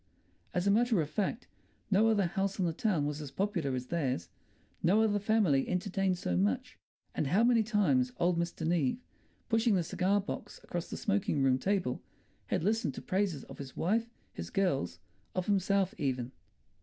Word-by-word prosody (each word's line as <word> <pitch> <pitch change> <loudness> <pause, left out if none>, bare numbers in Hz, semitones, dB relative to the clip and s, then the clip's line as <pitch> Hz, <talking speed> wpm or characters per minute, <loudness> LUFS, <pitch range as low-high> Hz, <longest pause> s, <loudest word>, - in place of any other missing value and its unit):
As 180 +1 +1
a 200 - +4
matter 230 -1 +3
of 155 - 0
fact, 210 +6 -1 0.5
no 205 +3 +5
other 210 -4 +3
house 195 +3 -1
in 185 - +1
the 165 - 0
town 180 -7 +1
was 150 +1 -3
as 145 - -6
popular 170 -4 -1
as 125 0 -3
theirs; 130 - -2 0.5
no 200 +6 +4
other 205 -2 +2
family 200 -10 +2
entertained 190 0 0
so 90 - -2
much. 95 +1 0 0.3
And 150 - -1
how 195 +10 +3
many 235 -1 +5
times 175 - +2
old 175 0 +2
Mr. 170 -1 -2
Neave, 160 - +1 0.5
pushing 225 -2 +3
the 180 - +2
cigar 190 +4 +1
box 205 +1 -6
across 175 -1 -4
the - - -5
smoking 195 -9 0
room 130 -1 +3
table, 190 -7 0 0.5
had - - 0
listened 205 - 0
to - - -6
praises 185 -7 0
of - - -12
his 135 -2 -8
wife, 225 +6 +1 0.2
his 85 0 -6
girls, 135 - 0 0.4
of 185 -1 -1
himself 195 -1 +2
even. 130 -4 -1
180 Hz, 180 wpm, -31 LUFS, 145-205 Hz, 0.5 s, no